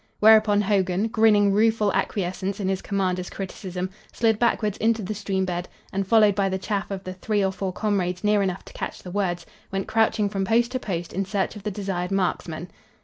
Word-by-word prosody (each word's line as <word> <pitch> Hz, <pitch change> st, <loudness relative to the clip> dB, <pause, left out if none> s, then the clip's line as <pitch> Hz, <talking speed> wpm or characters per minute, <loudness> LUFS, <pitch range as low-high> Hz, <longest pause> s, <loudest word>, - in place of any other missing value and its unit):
Whereupon 215 Hz, -1 st, +6 dB
Hogan, 195 Hz, 0 st, +1 dB
grinning 215 Hz, -3 st, +4 dB
rueful 215 Hz, -1 st, +3 dB
acquiescence 190 Hz, +1 st, -2 dB
in 195 Hz, -, -1 dB
his 190 Hz, -1 st, -1 dB
commander's 185 Hz, -3 st, -1 dB
criticism, 185 Hz, -1 st, -5 dB, 0.2 s
slid 225 Hz, -2 st, +1 dB
backwards 215 Hz, -3 st, +1 dB
into 225 Hz, -1 st, +1 dB
the 215 Hz, -, -3 dB
stream 195 Hz, -2 st, -1 dB
bed 180 Hz, -1 st, -3 dB, 0.2 s
and, 195 Hz, 0 st, -1 dB
followed 215 Hz, -1 st, +5 dB
by 195 Hz, 0 st, +1 dB
the 190 Hz, -, -1 dB
chaff 200 Hz, +1 st, -3 dB
of 195 Hz, -1 st, -5 dB
the 185 Hz, -, -5 dB
three 205 Hz, +2 st, 0 dB
or 190 Hz, -, +1 dB
four 190 Hz, 0 st, -3 dB
comrades 185 Hz, -3 st, -1 dB
near 210 Hz, 0 st, +3 dB
enough 190 Hz, -1 st, -2 dB
to -, -, -13 dB
catch -, -, -6 dB
the 180 Hz, -, -8 dB
words, 175 Hz, -3 st, -1 dB, 0.3 s
went 195 Hz, 0 st, -2 dB
crouching 220 Hz, -1 st, +2 dB
from 195 Hz, -1 st, -2 dB
post 235 Hz, +4 st, +2 dB
to 255 Hz, -, -1 dB
post 175 Hz, -7 st, -4 dB
in 195 Hz, -, 0 dB
search 195 Hz, +2 st, -2 dB
of 210 Hz, -, -8 dB
the 210 Hz, -, -3 dB
desired 190 Hz, -3 st, -3 dB
marksman. 180 Hz, -3 st, -2 dB
195 Hz, 205 wpm, -24 LUFS, 185-210 Hz, 0.3 s, Whereupon